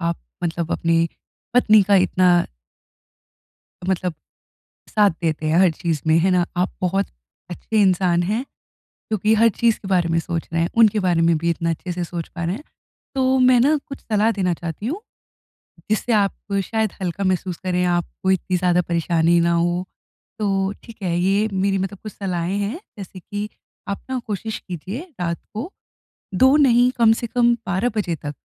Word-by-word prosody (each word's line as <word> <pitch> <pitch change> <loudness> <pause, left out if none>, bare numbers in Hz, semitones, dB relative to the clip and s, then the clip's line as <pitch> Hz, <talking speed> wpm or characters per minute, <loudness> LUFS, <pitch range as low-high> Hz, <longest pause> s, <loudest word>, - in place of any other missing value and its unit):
आप 170 -1 -1 0.3
मतलब 170 0 -2
अपनी 165 0 +2 0.5
पत्नी 215 -4 +6
का 200 - +5
इतना 180 0 +3 1.6
मतलब 185 -2 -1 0.8
साथ 210 -2 +4
देते 155 -1 -1
हैं 160 +2 +2
हर 185 -3 +5
चीज़ 165 -2 -2
में, 160 - +5
है 185 +3 +3
ना। 180 -1 +3
आप 180 +1 0
बहुत 195 +2 +1 0.4
अच्छे 210 +4 -1
इंसान 180 -2 +3
हैं 215 +7 -1 0.5
क्योंकि 215 0 -1
हर 230 +1 +5
चीज़ 230 -2 +3
के 195 - -8
बारे 180 -3 +2
में 165 0 +1
सोच 170 -1 -4
रहे 165 0 +1
हैं, 170 - -1
उनके 220 -2 +5
बारे 175 -3 +1
में 165 -1 +3
भी 170 +2 0
इतना 165 0 -1
अच्छे 175 +2 -4
से 175 0 -3
सोच 170 -1 -6
पा 170 -2 -6
रहे 175 - -1
हैं। 275 +8 -9 0.5
तो 265 0 +2
मैं 250 -1 +6
ना 295 +5 +4
कुछ 275 - -8
सलाह 215 0 +1
देना 185 -3 0
चाहती 170 +5 -6
हूँ, 330 +10 -3 0.9
जिससे 220 +2 0
आप 200 -2 +2 0.3
शायद 220 -1 -1
हल्का 185 +2 -2
महसूस 185 -1 0
करें, 180 -1 0
आपको 175 +2 -1
इतनी 185 -1 +1
ज़्यादा 180 0 +2
परेशानी 170 0 +2
ना 170 0 +2
हो। 175 +2 0 0.5
तो 195 -2 0
ठीक 230 - -12
है, 170 -2 0
ये 200 +4 +2
मेरी 195 +1 +1
मतलब 195 +1 -4
कुछ 215 - -6
सलाहें 185 -1 -2
हैं, 210 - -3 0.2
जैसे 190 -1 -9
कि 205 +3 -5 0.4
आप 200 - -3
ना 260 -1 -1
कोशिश 215 +1 -4
कीजिए 185 - -5 0.2
रात 170 -1 -1 0.2
को 255 - -5 0.6
2 265 +8 +5
नहीं 250 -4 +5
कम 225 -1 +6
से 235 - -3
कम 240 +1 +3
12 190 +6 0
बजे 185 -5 0
तक 145 -1 -6
185 Hz, 180 wpm, -21 LUFS, 170-215 Hz, 1.6 s, पत्नी